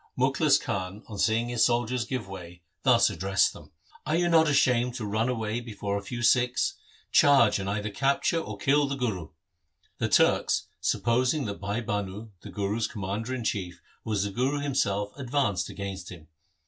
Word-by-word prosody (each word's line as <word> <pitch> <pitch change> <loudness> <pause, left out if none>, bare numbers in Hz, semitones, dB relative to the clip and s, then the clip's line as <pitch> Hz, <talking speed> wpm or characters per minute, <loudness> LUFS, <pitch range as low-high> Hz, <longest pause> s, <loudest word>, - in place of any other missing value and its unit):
Mukhlis - - +3
Khan, 95 +2 -4
on 105 -3 -8
seeing 115 +3 +1
his 120 -2 +2
soldiers 120 0 +1
giving 125 -6 -4
way, 90 -2 -10 0.2
thus - - +4
addressed 95 0 +1
them, - - -14 0.2
' - - -26
Are 155 - +1
you 175 +1 +2
not 160 -1 +5
ashamed 125 -3 +2
to 120 - -4
run 110 +4 0
away 115 -2 -2
before 105 -4 -4
a 100 - -2
few 120 +4 -6
Sikhs? 125 +2 +3 0.4
Charge, 135 -8 +5
and 95 0 -3
either 105 +1 -2
cap 135 +7 0
ture 165 - +1
or - - -7
kill 145 +1 +2
the 140 - -2
Guru.' 105 - -3 0.7
The - - 0
Turks, - - +3
supposing 125 +4 +1
that 100 -1 -5
Bhai 100 +3 -2
Bhanu, 105 +1 -4
the - - -10
Guru's 105 +2 -1
commander 105 +5 -4
in 125 - -5
chief, 90 -5 -3 0.2
was 105 -3 -1
the 100 - -3
Guru 130 +7 0
himself, 105 -8 0
advanced 125 -9 0
against 95 -2 -6
him. 80 -4 -12
110 Hz, 180 wpm, -27 LUFS, 100-125 Hz, 0.7 s, not